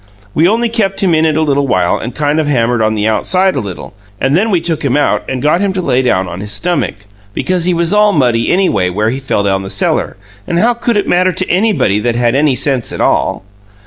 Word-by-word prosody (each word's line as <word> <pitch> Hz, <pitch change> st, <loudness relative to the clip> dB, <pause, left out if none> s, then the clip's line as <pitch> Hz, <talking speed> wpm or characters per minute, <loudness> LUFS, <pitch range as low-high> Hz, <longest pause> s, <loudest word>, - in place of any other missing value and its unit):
We 165 Hz, +3 st, +3 dB
only 230 Hz, +4 st, +1 dB
kept 210 Hz, -4 st, -1 dB
him 180 Hz, -3 st, +2 dB
in 160 Hz, 0 st, +3 dB
it 155 Hz, -1 st, 0 dB
a 160 Hz, -, +2 dB
little 140 Hz, -2 st, 0 dB
while 90 Hz, -7 st, +1 dB
and 120 Hz, +1 st, -6 dB
kind 150 Hz, +1 st, 0 dB
of 155 Hz, -, -1 dB
hammered 120 Hz, -4 st, +1 dB
on 110 Hz, 0 st, +1 dB
the 105 Hz, 0 st, 0 dB
outside 185 Hz, -, +1 dB
a -, -, 0 dB
little 100 Hz, -6 st, -7 dB, 0.3 s
and 135 Hz, +2 st, +1 dB
then 210 Hz, +6 st, +1 dB
we 185 Hz, -5 st, +2 dB
took 165 Hz, -1 st, -3 dB
him 140 Hz, 0 st, +1 dB
out 145 Hz, -, +1 dB
and 130 Hz, -1 st, -3 dB
got 155 Hz, +5 st, +2 dB
him 200 Hz, -2 st, 0 dB
to 190 Hz, -, -2 dB
lay 125 Hz, -4 st, +1 dB
down 95 Hz, -7 st, 0 dB
on 90 Hz, -, -7 dB
his 105 Hz, +1 st, -6 dB
stummick, 145 Hz, -, -2 dB, 0.3 s
because 180 Hz, -2 st, -1 dB
he 180 Hz, -, +2 dB
was 170 Hz, +2 st, +1 dB
all 210 Hz, 0 st, +4 dB
muddy 120 Hz, -, +1 dB
anyway, 110 Hz, -, +1 dB
where 105 Hz, +5 st, -1 dB
he 130 Hz, -, -4 dB
fell 130 Hz, -6 st, -1 dB
down 95 Hz, -1 st, 0 dB
the 95 Hz, -, -7 dB
cellar; -, -, -1 dB, 0.3 s
and 170 Hz, -, -1 dB
how 235 Hz, +7 st, +3 dB
could 235 Hz, -1 st, -1 dB
it 205 Hz, -, -1 dB
matter 185 Hz, +1 st, +2 dB
to 185 Hz, +1 st, -2 dB
anybody 185 Hz, -, +1 dB
that 120 Hz, +1 st, -1 dB
had 120 Hz, -1 st, +1 dB
any 140 Hz, 0 st, +2 dB
sense 130 Hz, -3 st, 0 dB
at -, -, -6 dB
all? -, -, 0 dB
145 Hz, 250 wpm, -13 LUFS, 115-180 Hz, 0.3 s, all